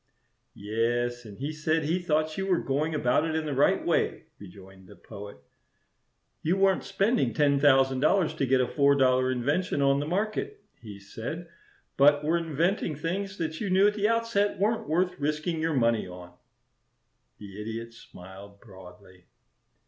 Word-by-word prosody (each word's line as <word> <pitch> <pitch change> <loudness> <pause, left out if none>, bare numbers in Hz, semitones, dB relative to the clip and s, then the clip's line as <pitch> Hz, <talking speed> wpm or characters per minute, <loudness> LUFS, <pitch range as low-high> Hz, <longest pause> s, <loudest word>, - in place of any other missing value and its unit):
"Yes; 120 +3 -2
and 100 -2 -11
he 145 +3 -4
said 155 +1 0
he 165 +5 0
thought 155 -2 -1
you 195 0 -3
were 185 -2 +2
going 150 +3 -1
about 125 0 +2
it 160 -1 -2
in 160 -1 -1
the 150 - -3
right 135 +2 +2
way," - - 0 0.2
rejoined 95 -1 -14
the - - -14
Poet. 100 -3 -11 1.0
"You 175 +5 0
weren't 195 -1 +2
spending 195 - 0
ten 140 -2 +3
thousand 135 -2 +4
dollars 165 +4 +2
to 135 - -2
get 130 +1 +3
a 125 - 0
four 140 -1 +3
dollar 130 -1 +3
invention 145 +7 -1
on 140 0 +3
the 145 - -3
market, 215 - -3 0.2
he 105 -3 -10
said, 120 - -7 0.5
but 145 +1 +5
were 160 +3 +1
inventing 165 +1 -1
things 195 +6 -4
that 160 -2 -4
you 205 - -2
knew 190 +2 +4
at 210 - +1
the 210 0 0
outset 230 -3 0
weren't 215 -2 -1
worth 180 +2 0
risking 155 +3 -2
your 160 -1 0
money 115 -5 +1
on." 90 0 -11 1.0
The 100 0 -10
Idiot 115 +2 -6
smiled 100 -1 -13
broadly. 95 -3 -16
145 Hz, 165 wpm, -27 LUFS, 115-170 Hz, 1.0 s, but